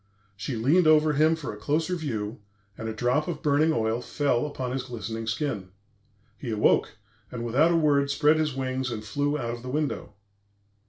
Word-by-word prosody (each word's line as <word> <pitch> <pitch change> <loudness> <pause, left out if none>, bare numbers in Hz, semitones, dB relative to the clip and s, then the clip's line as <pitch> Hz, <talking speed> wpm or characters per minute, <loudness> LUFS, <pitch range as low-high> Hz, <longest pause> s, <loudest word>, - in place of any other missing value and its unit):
She 110 +6 -4
leaned 150 +10 +3
over 155 0 +5
him 155 +3 +4
for 155 -8 -6
a - - -9
closer 155 - 0
view, 110 -11 -4 0.4
and 110 +1 -5
a - - -2
drop 125 +7 0
of 170 -3 -4
burning 150 +2 +3
oil 115 -3 0
fell 145 0 0
upon 130 -4 -4
his 130 +1 -1
glistening 115 -2 -6
skin. 115 -5 -2 0.7
He 125 - -5
awoke, 110 -1 +2 0.3
and 120 -1 -4
without 135 +8 +3
a - - +3
word 145 -3 +3
spread 150 +2 +3
his 155 -3 0
wings 130 0 -2
and 110 -2 -5
flew 145 +6 0
out 120 -4 -3
of 120 - -7
the 125 - -7
window. 145 -6 -2
135 Hz, 190 wpm, -26 LUFS, 115-150 Hz, 0.7 s, over